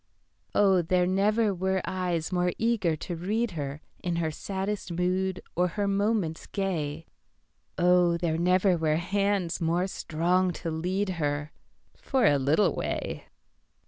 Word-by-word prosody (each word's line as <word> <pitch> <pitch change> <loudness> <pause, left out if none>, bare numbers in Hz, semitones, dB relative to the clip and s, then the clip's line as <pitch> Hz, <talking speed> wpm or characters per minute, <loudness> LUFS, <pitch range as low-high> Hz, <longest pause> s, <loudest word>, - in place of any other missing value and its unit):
Oh, 195 -3 +5
there 180 +2 +2
never 205 +3 +2
were 190 +1 0
eyes 180 -3 -2
more 180 -1 +1
eager 220 -8 +1
to 175 +3 -5
read 210 +7 -1
herIn 155 +3 -5
her 160 -2 0
saddest 195 +3 -4
mood 185 +2 -1
or 180 +1 +3
her 200 +3 -2
moments 200 -4 0
gay, 165 -6 -2 0.7
Oh, 180 -1 +4
there 165 -2 -1
never 180 +2 +3
were 155 -1 +2
hands 190 0 0
more 170 +2 +1
strong 180 0 0
to 165 - -4
lead 185 +5 -1
her—For 155 - -3
a 145 -7 +4
little 155 +6 +3
way. - - -3
180 Hz, 130 wpm, -28 LUFS, 165-195 Hz, 0.7 s, Oh